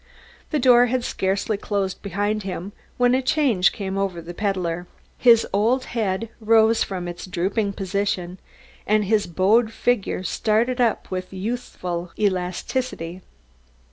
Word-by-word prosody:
The 305 Hz, -, 0 dB
door 245 Hz, -2 st, +6 dB
had 250 Hz, 0 st, -1 dB
scarcely 195 Hz, +2 st, -1 dB
closed 200 Hz, -2 st, -2 dB
behind 205 Hz, +2 st, -1 dB
him 190 Hz, 0 st, -5 dB, 0.3 s
when 245 Hz, 0 st, +4 dB
a 260 Hz, -, +3 dB
change 255 Hz, -8 st, +3 dB
came 195 Hz, -2 st, -4 dB
over 195 Hz, -3 st, -1 dB
the 170 Hz, +1 st, -8 dB
peddler. 180 Hz, -3 st, -2 dB, 0.3 s
His 235 Hz, -2 st, +6 dB
old 230 Hz, +6 st, +2 dB
head 215 Hz, -1 st, -1 dB
rose 225 Hz, 0 st, +4 dB
from 180 Hz, -3 st, -5 dB
its 175 Hz, +2 st, -7 dB
drooping 200 Hz, +4 st, -1 dB
position, 190 Hz, -2 st, -2 dB, 0.5 s
his 210 Hz, 0 st, +2 dB
bowed 210 Hz, +7 st, +3 dB
figure 230 Hz, -5 st, 0 dB
started 230 Hz, +6 st, +1 dB
up 235 Hz, -2 st, 0 dB
with 185 Hz, 0 st, -4 dB
youthful 185 Hz, -4 st, -4 dB
elasticity. 185 Hz, -1 st, -2 dB
200 Hz, 130 wpm, -23 LUFS, 185-230 Hz, 0.5 s, door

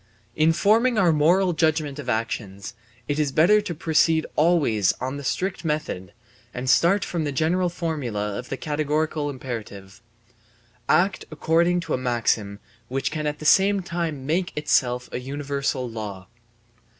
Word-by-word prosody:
In 155 Hz, +1 st, +4 dB
forming 220 Hz, +8 st, +3 dB
our 180 Hz, -5 st, +4 dB
moral 175 Hz, +5 st, +3 dB
judgement 155 Hz, -3 st, 0 dB
of 145 Hz, -, -6 dB
actions, 105 Hz, -2 st, -3 dB, 0.3 s
it 145 Hz, +1 st, -1 dB
is 150 Hz, -3 st, +1 dB
better 180 Hz, +9 st, +5 dB
to 185 Hz, -5 st, -5 dB
proceed 160 Hz, 0 st, +2 dB
always 150 Hz, -, +3 dB
on 130 Hz, +2 st, -5 dB
the 145 Hz, -, -7 dB
strict 185 Hz, +8 st, -2 dB
method 150 Hz, -, -3 dB, 0.4 s
and 125 Hz, +1 st, -4 dB
start 175 Hz, +9 st, +4 dB
from 170 Hz, -3 st, -2 dB
the 145 Hz, -, -2 dB
general 170 Hz, +6 st, +1 dB
formula 130 Hz, -, -3 dB
of 125 Hz, -, -9 dB
the 135 Hz, -, -3 dB
categorical 150 Hz, 0 st, -1 dB
imperative: 115 Hz, -6 st, -7 dB, 0.9 s
Act 190 Hz, +2 st, +2 dB
according 170 Hz, +3 st, +1 dB
to 170 Hz, -, -4 dB
a -, -, 0 dB
maxim 115 Hz, -5 st, 0 dB, 0.3 s
which 135 Hz, +2 st, -2 dB
can 155 Hz, -1 st, -2 dB
at 150 Hz, 0 st, -2 dB
the 155 Hz, -, -9 dB
same 195 Hz, +4 st, +4 dB
time 165 Hz, -6 st, -3 dB
make 175 Hz, +5 st, 0 dB
itself 125 Hz, -5 st, +1 dB
a -, -, -3 dB
universal 140 Hz, 0 st, -3 dB
law. 105 Hz, -5 st, -7 dB
150 Hz, 150 wpm, -24 LUFS, 125-170 Hz, 0.9 s, better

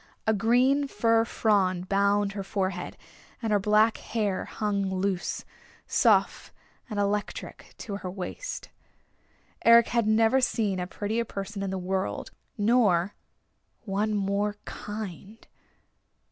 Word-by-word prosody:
A 220 Hz, -, +3 dB
green 250 Hz, +7 st, +3 dB
fir 230 Hz, -3 st, +2 dB
frond 185 Hz, -6 st, +1 dB
bound 200 Hz, +1 st, +2 dB
her 200 Hz, 0 st, -5 dB
forehead; 190 Hz, -2 st, -3 dB, 0.4 s
and 225 Hz, -3 st, -1 dB
her 205 Hz, -, +4 dB
black 215 Hz, +3 st, +3 dB
hair 210 Hz, -4 st, -2 dB
hung 200 Hz, -2 st, -1 dB
loose, 190 Hz, -1 st, -2 dB, 0.4 s
soft -, -, +2 dB, 0.4 s
and 210 Hz, -2 st, -3 dB
electric 205 Hz, +1 st, -3 dB
to 200 Hz, -3 st, -5 dB
her 185 Hz, -, -6 dB
waist. 195 Hz, -, -6 dB, 0.9 s
Eric 230 Hz, 0 st, +7 dB
had 235 Hz, -2 st, +1 dB
never 225 Hz, +4 st, +4 dB
seen 210 Hz, -6 st, 0 dB
a 180 Hz, -, -3 dB
prettier 215 Hz, +5 st, -2 dB
person 200 Hz, -1 st, -6 dB
in 195 Hz, -, -2 dB
the 190 Hz, -, -2 dB
world, 190 Hz, +1 st, -3 dB, 0.3 s
nor 205 Hz, -5 st, +3 dB, 0.7 s
one 210 Hz, +1 st, -1 dB
more 200 Hz, +1 st, 0 dB
kind. 210 Hz, 0 st, -7 dB
205 Hz, 120 wpm, -27 LUFS, 195-225 Hz, 0.9 s, Eric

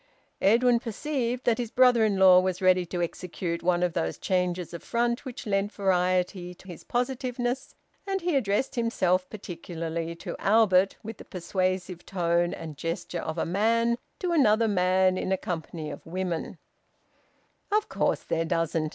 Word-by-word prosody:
Edwin 235 Hz, +3 st, +4 dB
perceived 245 Hz, +1 st, -3 dB
that 240 Hz, 0 st, +2 dB
his 240 Hz, -2 st, -2 dB
brother 245 Hz, -1 st, +5 dB
in 210 Hz, -3 st, +2 dB
law 185 Hz, -1 st, +8 dB
was 185 Hz, -1 st, -1 dB
ready 185 Hz, -1 st, +3 dB
to 175 Hz, 0 st, -2 dB
execute 170 Hz, 0 st, -4 dB
one 175 Hz, 0 st, +2 dB
of 175 Hz, -2 st, 0 dB
those 80 Hz, -, -2 dB
changes 180 Hz, -2 st, -1 dB
of 170 Hz, -, -6 dB
front 235 Hz, +2 st, -1 dB
which 255 Hz, -2 st, -7 dB
lent 200 Hz, -1 st, 0 dB
variety 180 Hz, -2 st, 0 dB
to 190 Hz, -, -18 dB
his 175 Hz, -, -9 dB
positiveness, 250 Hz, 0 st, -2 dB, 0.3 s
and 390 Hz, 0 st, 0 dB
he 345 Hz, -2 st, 0 dB
addressed 240 Hz, 0 st, +1 dB
himself 185 Hz, -7 st, +1 dB
particularly 170 Hz, -4 st, -5 dB
to -, -, -6 dB
Albert, 195 Hz, -3 st, +4 dB
with 220 Hz, 0 st, -7 dB
the -, -, -12 dB
persuasive 185 Hz, 0 st, -2 dB
tone 175 Hz, -2 st, 0 dB
and 155 Hz, -3 st, -7 dB
gesture 165 Hz, +2 st, -4 dB
of 160 Hz, +1 st, -4 dB
a -, -, 0 dB
man 230 Hz, +6 st, +1 dB, 0.2 s
to 360 Hz, -, -2 dB
another 230 Hz, -8 st, +4 dB
man 185 Hz, -1 st, +2 dB
in -, -, -2 dB
a 190 Hz, -, +2 dB
company 160 Hz, -3 st, -5 dB
of -, -, -9 dB
women 180 Hz, -1 st, -4 dB, 1.1 s
"Of 425 Hz, +1 st, +2 dB
course -, -, 0 dB
there 165 Hz, -, -1 dB
doesn't! 165 Hz, -1 st, 0 dB
185 Hz, 160 wpm, -27 LUFS, 175-230 Hz, 1.1 s, law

